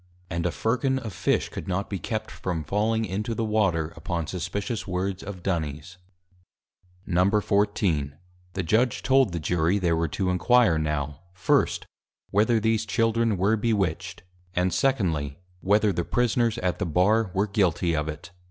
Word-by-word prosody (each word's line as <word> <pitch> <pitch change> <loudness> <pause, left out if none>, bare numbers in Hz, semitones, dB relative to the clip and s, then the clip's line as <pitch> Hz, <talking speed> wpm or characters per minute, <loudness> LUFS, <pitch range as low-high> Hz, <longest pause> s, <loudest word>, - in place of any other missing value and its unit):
And 85 0 0
a - - -1
Firkin 130 +6 0
of 110 -6 -5
Fish 95 - 0
could - - -7
not 95 +2 -1
be 100 - -4
kept 110 -2 -4
from 85 -4 -3
falling 110 +7 0
into 105 +4 -3
the 115 - -1
Water, 95 -8 +1
upon 85 -4 -3
suspicious 95 +8 -4
words 95 +1 -2
of 95 -3 -8
Duny's. 85 -1 -3 1.1
XIV. 100 -5 +1 0.4
The 95 - -2
Judg 110 +9 +3
told 135 -5 +4
the 85 - -3
Jury, 85 +4 +1
they 90 -4 +1
were 80 0 +1
to 90 +4 -1
inquire 100 -2 +4
now, 75 -2 -2 0.2
first, 95 +1 +1 0.5
whether 110 +3 +3
these 110 0 +1
Children 115 -1 +1
were 100 +5 +3
Bewitched; 95 -6 -1 0.3
and 90 0 +1
secondly, 80 - 0 0.2
Whether 105 +2 +3
the 85 - -1
Prisoners 120 +2 +1
at 90 -6 -1
the - - -1
Bar 100 +6 +2
were 100 +2 +2
guilty 90 -5 +1
of 75 0 -1
it. 80 +3 -8
95 Hz, 155 wpm, -26 LUFS, 85-110 Hz, 1.1 s, told